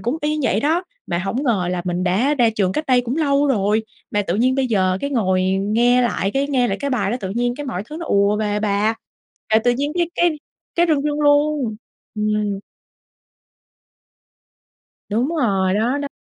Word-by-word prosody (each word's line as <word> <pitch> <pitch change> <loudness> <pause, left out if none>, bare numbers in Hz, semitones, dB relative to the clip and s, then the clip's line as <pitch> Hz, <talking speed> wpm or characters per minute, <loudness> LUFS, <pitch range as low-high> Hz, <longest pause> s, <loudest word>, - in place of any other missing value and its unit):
cũng 245 +6 -1
y 305 0 -1
vậy 210 -5 +1
đó, 320 +7 +1 0.2
mà 170 -1 -1
hổng 195 +8 -2
ngờ 205 -10 +1
là 180 -1 -2
mình 180 0 -1
đã 225 +11 +2
ra 240 -4 +3
trường 200 -4 0
cách 305 +9 -3
đây 255 -2 +4
cũng 245 +3 -3
lâu 290 -2 +2
rồi, 215 -3 +1 0.3
mà 205 - +1
tự 180 -2 -2
nhiên 250 +4 +2
bây 270 -1 +1
giờ 185 -5 +1
cái 280 - -3
ngồi 190 -8 +1 0.2
nghe 240 +5 +3
lại 205 -4 0
cái 275 +3 0
nghe 255 -4 +1
lại 195 - -1
cái 280 0 -2
bài 200 -6 0
đó 240 - -1
tự 190 -2 -4
nhiên 240 +3 -1
cái 290 - -6
mọi 195 -8 -3
thứ 310 - -6
nó 335 - -6
ùa 200 +1 +2
về 210 -1 -1
bà, 210 +1 +1 0.6
là 220 - +7
tự 245 - +4
nhiên 280 +5 -1
cái 345 -1 +1
cái 345 0 +3 0.4
cái 345 0 +3
rưng 295 -3 +2
rưng 295 0 -1
luôn. 290 -5 +2 0.4
Ừm. 210 -1 -1 2.5
Đúng 230 +6 0
rồi, 195 -8 +1
đó, 240 +6 +1
đó. 285 0 -3
235 Hz, 205 wpm, -20 LUFS, 200-280 Hz, 2.5 s, là